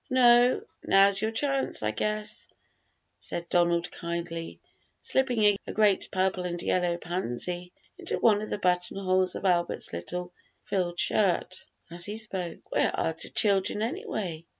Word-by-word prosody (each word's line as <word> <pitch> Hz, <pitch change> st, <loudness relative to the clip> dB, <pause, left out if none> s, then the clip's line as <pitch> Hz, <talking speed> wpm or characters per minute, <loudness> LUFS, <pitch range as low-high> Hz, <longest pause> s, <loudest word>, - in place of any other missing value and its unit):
"No; 245 Hz, -1 st, +5 dB, 0.2 s
now's 195 Hz, 0 st, +4 dB
your 220 Hz, -, +1 dB
chance, 270 Hz, -, 0 dB
I 105 Hz, -, +1 dB
guess," 215 Hz, -, -2 dB, 0.7 s
said 170 Hz, 0 st, -4 dB
Donald 170 Hz, 0 st, +2 dB
kindly, 170 Hz, -1 st, -5 dB, 0.4 s
slipping 230 Hz, -6 st, +2 dB
a -, -, -5 dB
great 210 Hz, -3 st, +2 dB
purple 185 Hz, -1 st, 0 dB
and 175 Hz, -1 st, -3 dB
yellow 175 Hz, 0 st, 0 dB
pansy 175 Hz, +1 st, -4 dB, 0.3 s
into -, -, -2 dB
one 210 Hz, -2 st, +3 dB
of 215 Hz, -, -6 dB
the -, -, -2 dB
buttonholes 185 Hz, 0 st, +1 dB
of -, -, -5 dB
Albert's 175 Hz, -, 0 dB
little 175 Hz, -, -5 dB, 0.3 s
frilled 175 Hz, -3 st, -2 dB
shirt 190 Hz, -1 st, +1 dB, 0.2 s
as 170 Hz, 0 st, +1 dB
he 210 Hz, +1 st, -4 dB
spoke. 190 Hz, -6 st, -2 dB
"Where -, -, +2 dB
are 165 Hz, -, 0 dB
de 160 Hz, -, -6 dB
children, 200 Hz, 0 st, +2 dB
anyway?" 215 Hz, -, -4 dB
185 Hz, 140 wpm, -28 LUFS, 175-215 Hz, 0.7 s, No